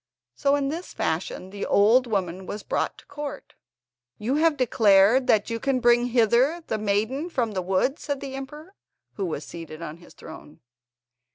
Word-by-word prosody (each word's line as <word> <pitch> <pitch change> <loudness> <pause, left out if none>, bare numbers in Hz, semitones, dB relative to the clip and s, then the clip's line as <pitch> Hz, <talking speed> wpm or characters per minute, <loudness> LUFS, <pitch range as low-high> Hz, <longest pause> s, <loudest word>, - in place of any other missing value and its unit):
So 280 - +2
in 280 -1 -1
this 335 +5 -6
fashion 180 +3 -3
the 200 0 -6
old 230 +5 +4
woman 190 -3 -2
was 205 -1 -6
brought - - -2
to - - -17
court. 290 0 -7 0.6
"You 230 +5 -2
have 320 -1 +3
declared 225 0 +4
that 215 +1 +2
you 230 - -2
can 265 +1 0
bring 240 0 +4
hither 245 +7 +2
the 220 - -2
maiden 215 - -1
from 240 -9 -1
the 190 -2 -2
wood?" 190 - 0
said 285 -2 -3
the 275 -1 -7
emperor, 300 +7 -8 0.4
who 195 -3 -3
was 155 -2 -4
seated 165 -1 -9
on 155 0 -7
his 175 - -17
throne. 155 -1 -12
230 Hz, 175 wpm, -25 LUFS, 195-275 Hz, 0.6 s, old